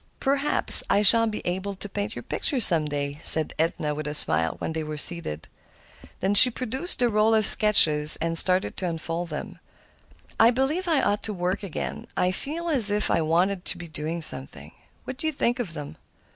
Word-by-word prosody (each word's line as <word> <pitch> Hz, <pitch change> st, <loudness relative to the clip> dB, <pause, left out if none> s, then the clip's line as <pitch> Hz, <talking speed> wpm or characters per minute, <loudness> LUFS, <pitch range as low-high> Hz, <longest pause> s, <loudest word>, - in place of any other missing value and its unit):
"Perhaps 275 Hz, +1 st, +5 dB
I 205 Hz, -, 0 dB
shall 230 Hz, +3 st, +7 dB
be 215 Hz, -, -7 dB
able 190 Hz, +3 st, -5 dB
to 200 Hz, -, -8 dB
paint 205 Hz, +2 st, -7 dB
your -, -, -9 dB
picture 280 Hz, -5 st, +1 dB
some 170 Hz, -8 st, +1 dB
day," 145 Hz, -1 st, -6 dB
said 160 Hz, -1 st, +5 dB
Edna 160 Hz, -2 st, -3 dB
with 150 Hz, 0 st, -8 dB
a 150 Hz, -, -6 dB
smile 80 Hz, -, -3 dB
when 160 Hz, -, -7 dB
they 160 Hz, -1 st, -5 dB
were 155 Hz, 0 st, -8 dB
seated. 150 Hz, -, -7 dB, 0.9 s
She 250 Hz, +5 st, +9 dB
produced 260 Hz, +8 st, -5 dB
the 245 Hz, -, 0 dB
roll 220 Hz, 0 st, 0 dB
of 215 Hz, -1 st, 0 dB
sketches 155 Hz, -9 st, +5 dB
and 165 Hz, 0 st, -4 dB
started 185 Hz, +2 st, +2 dB
to 185 Hz, -, -4 dB
unfold 165 Hz, +1 st, -6 dB
them. 150 Hz, -, -9 dB, 0.8 s
"I 225 Hz, -, +4 dB
believe 270 Hz, +9 st, -3 dB
I 315 Hz, -5 st, -1 dB
ought 205 Hz, +1 st, -2 dB
to 215 Hz, -, -6 dB
work 180 Hz, +3 st, -4 dB
again. 195 Hz, -6 st, -8 dB
I 180 Hz, -, -1 dB
feel 310 Hz, -, -7 dB
as 260 Hz, -10 st, +6 dB
if 210 Hz, +1 st, -2 dB
I -, -, -1 dB
wanted 175 Hz, +4 st, -2 dB
to -, -, -3 dB
be 175 Hz, -1 st, -11 dB
doing 155 Hz, +2 st, -7 dB
something. 135 Hz, -3 st, -8 dB, 0.3 s
What 255 Hz, -, -9 dB
do 315 Hz, -, -5 dB
you -, -, -1 dB
think 245 Hz, -2 st, -3 dB
of 200 Hz, -9 st, -6 dB
them? 145 Hz, -1 st, -10 dB
185 Hz, 200 wpm, -22 LUFS, 160-230 Hz, 0.9 s, She